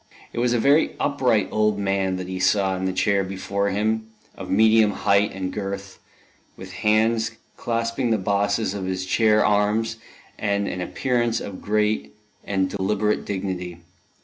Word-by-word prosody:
It - - -3
was 120 0 +2
a 120 - +2
very 140 +6 +3
upright 125 -8 +1
old 105 -1 +1
man 95 -2 0
that 90 0 -5
he 95 0 -4
saw 95 0 +2
in 95 0 -3
the 95 - 0
chair 100 +1 +1
before 100 +1 -2
him, 110 +2 -1 0.3
of - - -8
medium 110 +1 +5
height 100 0 +2
and 95 -1 -4
girth, 100 -1 -5 0.6
with 95 0 -9
hands 110 +3 +1 0.2
clasping 115 +2 -1
the 110 - +2
bosses 100 +1 0
of 100 -2 -4
his 95 0 -3
chair 110 +2 +3
arms, 105 +2 +1 0.4
and 100 -1 0
an 90 - -4
appearance 120 +3 0
of 100 -2 -7
great 105 -9 0 0.3
and 95 -2 0
deliberate 105 +2 -1
dignity. 95 -3 -4
100 Hz, 155 wpm, -23 LUFS, 95-110 Hz, 0.6 s, medium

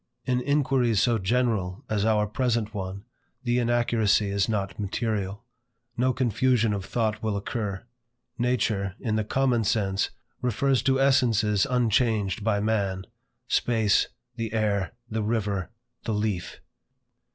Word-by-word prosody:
In 125 -1 +1
inquiries 130 -5 +2
so 115 0 +2
general 110 0 0
as 105 -1 0
our 105 -1 +3
present 115 -1 -1
one, 95 -1 -5 0.4
the 120 0 +1
inaccuracy 115 -4 +2
is 100 +2 +1
not 100 -3 -2
material; 105 0 -2 0.5
no 125 +2 +2
confusion 125 -2 +2
of 100 -2 -3
thought 110 -2 -1
will 110 -2 -1
occur. 100 -1 -3 0.5
Nature, 110 -6 0
in 110 -3 -1
the 110 - +1
common 125 +1 +1
sense, 100 -2 +1 0.3
refers 125 +2 +1
to 135 0 +2
essences 115 -7 +3
unchanged 110 -5 +1
by 105 -2 +1
man; 100 -3 -1 0.4
space, 110 -5 +2 0.3
the 115 -2 -3
air, 105 -3 0
the 110 -1 -2
river, 105 -4 -1 0.4
the 110 - -1
leaf. 105 -4 -2
110 Hz, 130 wpm, -26 LUFS, 100-120 Hz, 0.5 s, our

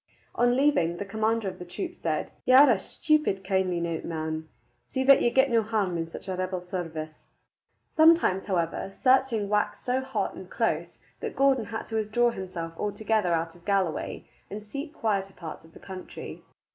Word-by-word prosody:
On 245 0 +3
leaving, 220 - +2
the 200 - -4
commander 220 +1 0
of 190 - -5
the - - -6
troop 340 - -5
said, - - -2
"Ye 255 - +5
are 275 0 +9
a 210 - +2
stupid 300 -5 0
kindly 190 -2 0
nowt, 170 -1 -2
man. 160 -1 -4 0.4
See 260 - 0
that 275 +1 +7
ye - - +4
get 265 +2 +3
no 230 -1 +4
harm 210 -5 -1
in 165 -1 -2
such 165 - -9
a 190 - -2
rebel 185 0 -2
service." 165 -4 -6 0.6
Sometimes, 315 - +4
however, 175 -2 -1
searching 255 -3 +2
waxed 210 0 0
so 255 +1 +1
hot 265 0 -2
and - - -10
close - - -1 0.2
that - - -5
Gordon 270 -4 +3
had 225 +2 -5
to 225 - -4
withdraw 220 +3 +2
himself 180 -5 -6
altogether 210 -2 0
out 165 0 0
of 170 0 -19
Galloway 195 -5 -1 0.2
and 210 +1 -6
seek 275 +8 -6
quieter 200 -9 -1
parts 165 -3 -9
of 165 - -19
the - - -13
country. 190 -1 -8
205 Hz, 185 wpm, -27 LUFS, 175-245 Hz, 0.6 s, are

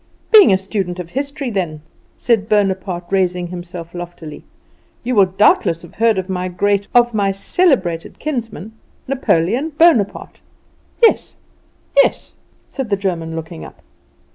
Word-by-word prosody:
"Being 430 - +8
a 190 - +4
student 190 -2 -4
of 170 -1 -7
history 280 -1 -4
then," 165 -7 -3 0.3
said 220 -4 0
Bonaparte, 190 -3 0
raising 180 -2 0
himself 175 -1 -8
loftily, 175 -3 -9 0.6
"you 250 +1 -2
will 200 -4 +5
doubtless 185 -3 +2
have 170 - -14
heard 225 -1 +2
of 185 -1 -3
my 185 -1 -3
great, 200 +2 0
of 240 -1 +4
my 200 -2 +1
celebrated 195 - 0
kinsman, 230 - -5 0.4
Napoleon 255 - 0
Bonaparte?" 295 - +2 0.6
"Yes, 455 - +3 0.6
yes," - - +2 0.3
said 265 -5 -5
the 200 - +1
German, 170 -4 -3
looking 160 - -7
up. 75 - -13
195 Hz, 135 wpm, -18 LUFS, 175-230 Hz, 0.6 s, Being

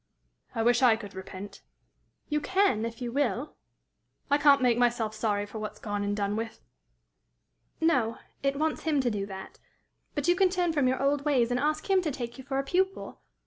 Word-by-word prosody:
"I 225 - +1
wish 240 +1 +4
I 245 -4 +6
could 205 -3 -9
repent." 190 +1 -8 0.7
"You 300 -1 0
can, 375 - +2
if 230 +2 -6
you 240 - -3
will." 265 0 -1 0.8
"I 285 - +4
can't 285 -1 +6
make 245 -2 +3
myself 235 -3 +1
sorry 210 -2 0
for 215 +2 -8
what's 215 -1 -5
gone 205 -2 -3
and 205 0 -1
done 200 0 0
with." 225 0 -4 1.2
"No; 255 -9 +2 0.2
it 275 0 0
wants 310 +1 0
him 310 -3 +1
to 245 -2 0
do 200 -2 -3
that. 190 -1 -9 0.6
But 290 +1 -1
you 350 - +5
can 380 0 +4
turn 355 -2 0
from 285 -4 +2
your 260 +1 +1
old 285 0 +2
ways, 255 -5 +2
and 245 - +1
ask 305 +2 0
him 385 -1 +4
to 335 - -1
take 240 -2 -5
you - - -8
for 270 0 -3
a 275 - +1
pupil. 380 +6 -1
250 Hz, 200 wpm, -28 LUFS, 220-295 Hz, 1.2 s, I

